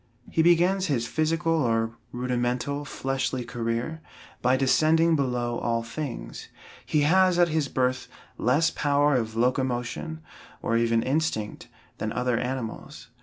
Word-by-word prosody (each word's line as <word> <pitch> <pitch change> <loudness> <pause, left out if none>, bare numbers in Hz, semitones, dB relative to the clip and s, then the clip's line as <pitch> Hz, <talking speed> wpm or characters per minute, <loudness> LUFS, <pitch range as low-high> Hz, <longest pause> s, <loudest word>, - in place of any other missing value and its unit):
He 160 - +2
begins 175 +3 +3
his 125 -6 0
physical, 165 +5 0
or 115 -7 +1 0.2
rudimental, 125 +3 -2
fleshly 135 -2 -2
career 120 +7 -3 0.4
by 125 +1 +3
descending 160 +5 +3
below 125 -4 -1
all 115 -1 -1
things. 125 +2 -6 0.4
He 150 - +1
has 185 +4 +4
at 175 -1 +4
his 155 -2 0
birth 130 -1 -1 0.3
less 150 +7 +2
power 145 0 +2
of 110 -3 -1
locomotion, 125 +5 -1 0.4
or 115 - -1
even 115 0 +2
instinct, 130 -7 -2 0.3
than 110 - -2
other 125 -1 0
animals. 125 -2 -5
130 Hz, 125 wpm, -26 LUFS, 120-160 Hz, 0.4 s, has